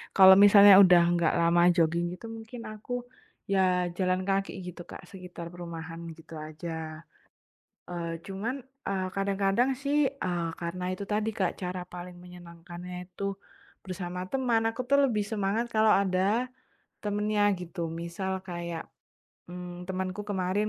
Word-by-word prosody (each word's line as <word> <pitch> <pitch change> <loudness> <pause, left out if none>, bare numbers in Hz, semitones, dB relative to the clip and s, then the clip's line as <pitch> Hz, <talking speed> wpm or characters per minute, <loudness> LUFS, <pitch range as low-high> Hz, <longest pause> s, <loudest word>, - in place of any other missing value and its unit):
kalau 190 -1 +9
misalnya 205 -1 +9
udah 180 -2 +7
nggak 170 -2 +2
lama 170 +1 +4
jogging 170 0 +2
gitu 180 - -12
mungkin 225 +2 -9
aku, 245 +3 -5 0.5
ya 185 -2 +2
jalan 185 -1 +1
kaki 195 0 +1
kayak 190 - -7
gitu 175 - -11
Kak, - - -10
sekitar 180 -3 -9
perumahan 165 -1 -7 0.2
gitu 165 0 -15
aja. 155 0 -7 0.9
Eee, 170 -1 -4
cuman, 205 +7 -3 0.3
eee, 190 -1 -1
kadang-kadang 195 +4 +1
sih, 285 +1 +1
eee, 175 -11 -3
karena 170 +1 -4
itu 195 +2 -5
tadi 215 +1 +1
Kak 190 -4 0
cara 180 0 -3
paling 180 0 -8
menyenangkannya 175 0 -10 0.2
itu 200 +1 -3 0.5
bersama 180 -1 -5
teman. 250 -4 +1
Aku 255 - -4
tuh 280 - +5
lebih 215 -5 0
semangat 210 +2 -1
kalau 215 0 +5
ada 200 +5 +2 0.6
temennya 210 0 0 0.2
gitu. 175 -1 -5
Misal 170 +3 -4
kayak, 170 -2 -5 0.7
mmm, 180 0 -7
temenku 185 +1 -3
kemarin 195 +1 0
185 Hz, 140 wpm, -28 LUFS, 175-205 Hz, 0.9 s, kalau